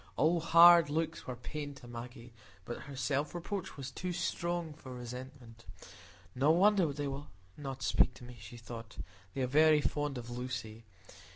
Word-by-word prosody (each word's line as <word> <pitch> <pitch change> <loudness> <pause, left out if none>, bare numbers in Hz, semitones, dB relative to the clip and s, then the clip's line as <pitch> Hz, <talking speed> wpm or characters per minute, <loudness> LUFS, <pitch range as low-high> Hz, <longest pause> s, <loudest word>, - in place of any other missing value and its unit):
All 165 +3 +3
hard 170 -1 +8
looks 160 +1 -2
were 125 - -4
pain 145 +4 -6
to 120 - -13
Maggie, 120 0 -9 0.3
but 120 - -5
her 140 -1 -9
self 140 +4 -1
reproach 175 +1 -4
was 135 -1 -6
too 180 +7 -4
strong 170 -1 -2
for 130 -4 -10
resentment. 125 -1 -9 0.7
No 135 +4 +2
wonder 185 -1 +4
they 145 0 -3
will 140 +1 -5 0.3
not 135 -2 -6
speak 125 - +3
to - - -13
me, 120 0 -11
she 115 +2 -10
thought; 115 -1 -9 0.4
they 135 - -1
are - - +3
very 155 +4 +5
fond 145 -2 -1
of 120 0 -7
Lucy. 120 -3 -5
135 Hz, 170 wpm, -33 LUFS, 125-155 Hz, 0.7 s, hard